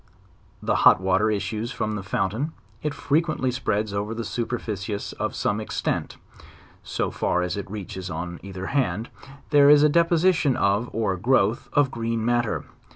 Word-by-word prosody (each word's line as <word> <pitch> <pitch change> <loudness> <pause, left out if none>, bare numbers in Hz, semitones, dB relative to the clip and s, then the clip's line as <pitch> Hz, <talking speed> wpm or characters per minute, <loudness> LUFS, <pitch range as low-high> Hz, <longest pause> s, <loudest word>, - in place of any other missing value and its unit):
When - - -11
the - - +2
hot - - +6
water 95 +3 +2
issues 110 +2 -2
from 110 0 -2
the 105 - -3
fountain, 105 - -2 0.3
it 150 - -1
frequsntly 145 -2 0
spreads 110 -4 -1
over 105 +2 -2
a 115 0 -4
superficious 110 -3 -3
of - - -3
some 105 +1 0
extent;. 110 - -3 0.6
so - - -2
far 90 - 0
as 90 0 -2
it 100 -2 -5
reaches 95 -2 -6
on. 85 +1 -5
either 95 -1 -7
hand, 115 -5 0 0.4
there 145 -1 +7
is 145 0 +7
a 150 - +6
deposition 170 -3 +3
of, 100 +4 +1
or 110 -4 0
growth, 115 +1 +2
of 145 -2 +3
green 115 -1 -2
matter. 120 -1 +1
110 Hz, 160 wpm, -24 LUFS, 100-135 Hz, 0.6 s, there